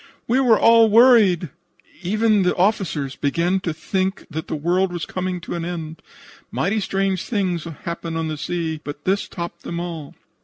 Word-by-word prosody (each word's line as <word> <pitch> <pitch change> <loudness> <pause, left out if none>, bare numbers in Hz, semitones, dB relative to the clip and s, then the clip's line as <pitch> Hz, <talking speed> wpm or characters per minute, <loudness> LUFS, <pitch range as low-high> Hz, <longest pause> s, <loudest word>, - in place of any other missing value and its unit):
We 250 +3 +2
were 240 -5 +4
all 230 -1 +6
worried. 210 - +5 0.5
Even 215 +3 +2
the 180 -1 +1
officers 175 -8 0
began 170 +6 0
to 185 -3 -3
think 190 +4 -2
that 160 +1 -5
the - - -3
world 175 +5 +1
was 175 -1 -4
coming 185 -1 -3
to - - -6
an 170 -1 -3
end. 165 -2 -6 0.5
Mighty 195 - 0
strange 195 -2 -1
things 185 -7 -1
happen 165 +1 -5
on 165 0 -2
the 155 - -3
sea, 160 -2 -3
but 145 0 -8
this 195 +2 +1
topped 170 -1 -7
them 170 - -5
all. 165 -5 -6
175 Hz, 170 wpm, -21 LUFS, 165-195 Hz, 0.5 s, all